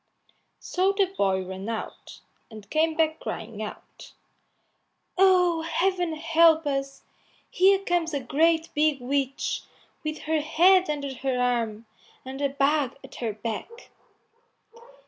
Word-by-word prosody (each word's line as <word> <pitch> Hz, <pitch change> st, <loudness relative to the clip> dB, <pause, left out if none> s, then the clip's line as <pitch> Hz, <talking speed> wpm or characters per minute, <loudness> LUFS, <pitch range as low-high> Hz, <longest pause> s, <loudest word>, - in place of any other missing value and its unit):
So 375 Hz, +2 st, 0 dB
the 390 Hz, -2 st, +1 dB
boy 190 Hz, -, +1 dB
ran 190 Hz, +3 st, -6 dB
out, 225 Hz, -1 st, -7 dB, 0.3 s
and 215 Hz, -3 st, -12 dB
came 315 Hz, +1 st, +2 dB
back 320 Hz, 0 st, +1 dB
crying 220 Hz, -1 st, -6 dB
out, 215 Hz, -, -9 dB, 1.0 s
"Oh, 360 Hz, -3 st, +4 dB
Heaven 350 Hz, 0 st, 0 dB
help 325 Hz, 0 st, +4 dB
us! 275 Hz, -1 st, -3 dB, 0.5 s
here 390 Hz, +2 st, +5 dB
comes 350 Hz, -4 st, -1 dB
a 285 Hz, -, -1 dB
great 325 Hz, +5 st, +1 dB
big 300 Hz, -2 st, +2 dB
witch, 270 Hz, +1 st, -2 dB, 0.4 s
with 310 Hz, 0 st, -4 dB
her 315 Hz, 0 st, 0 dB
head 355 Hz, +4 st, +4 dB
under 285 Hz, -2 st, -3 dB
her 260 Hz, 0 st, -2 dB
arm, 230 Hz, -3 st, -1 dB, 0.4 s
and 265 Hz, +2 st, -7 dB
a 280 Hz, -, +1 dB
bag 280 Hz, -1 st, +1 dB
at -, -, -13 dB
her 225 Hz, -3 st, -2 dB
back." 230 Hz, -, -7 dB
300 Hz, 125 wpm, -26 LUFS, 250-335 Hz, 1.0 s, here